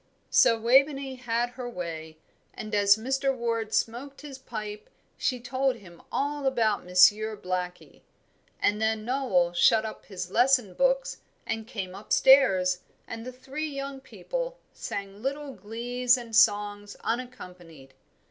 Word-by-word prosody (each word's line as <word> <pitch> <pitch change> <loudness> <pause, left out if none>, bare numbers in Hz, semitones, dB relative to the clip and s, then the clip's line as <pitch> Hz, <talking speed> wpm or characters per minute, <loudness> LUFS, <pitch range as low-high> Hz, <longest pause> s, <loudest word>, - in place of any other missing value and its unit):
So 230 -1 +5
Waveney 270 +3 +3
had 240 -1 -1
her 245 0 -6
way, 160 -6 -6 0.4
and 215 0 -7
as 200 0 +5
Mr. 270 +3 -1
Ward 230 -2 -2
smoked 255 +6 -2
his 280 -3 -9
pipe 215 -4 -7 0.3
she 250 -2 -1
told 260 +2 0
him 175 -7 -15
all 285 0 -1
about 225 -6 +1
Monsieur 205 +5 +4
Blackie; 180 -1 -5 0.6
and 210 +1 +1
then 220 -1 0
Noel 225 -10 +1
shut 215 +5 +4
up 220 - -8
his 185 -2 -6
lesson 245 -4 +3
books 270 +5 +1 0.3
and 225 0 -4
came 195 -7 -5
up 200 +2 -12
stairs, 190 -10 +5 0.3
and 225 0 -7
the - - -5
three 270 +5 -5
young 275 -1 -6
people - - -5 0.2
sang 200 +1 -6
little 280 +2 -4
glees 245 +5 0
and 235 -2 -6
songs 205 -1 +2
unaccompanied. 180 - -6
230 Hz, 140 wpm, -27 LUFS, 200-265 Hz, 0.6 s, So